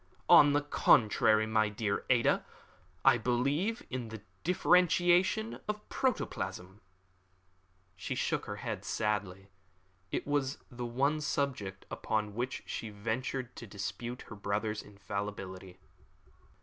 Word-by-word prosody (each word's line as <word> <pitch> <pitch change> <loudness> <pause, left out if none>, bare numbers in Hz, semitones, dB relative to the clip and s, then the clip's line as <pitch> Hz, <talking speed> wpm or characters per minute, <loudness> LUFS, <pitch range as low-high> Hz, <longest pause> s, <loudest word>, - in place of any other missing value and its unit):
"On 145 -1 +8
the 145 0 +2
contrary, 110 -5 +4
my 110 -1 +2
dear 105 -1 -2
Ada, 120 -2 +3 0.6
I 130 -3 +6
believe 140 - 0
in 125 -2 -3
the 110 -2 -9 0.2
differentiation 180 +4 +3
of 210 0 -4
protoplasm." 95 - -2 1.1
She 85 - -4
shook - - -1
her - - -4
head - - -5
sadly. 100 -3 -2 0.6
It - - -2
was 145 -2 0
the 120 0 -5
one 140 +6 +1
subject 125 -10 -2
upon 105 -1 -1
which 125 +4 -3
she 110 - -5
ventured 120 +4 -3
to 115 - -8
dispute 110 +5 -5
her 105 - -10
brother's 105 +1 -2
infallibility. 95 -2 -6
115 Hz, 115 wpm, -32 LUFS, 105-140 Hz, 1.1 s, On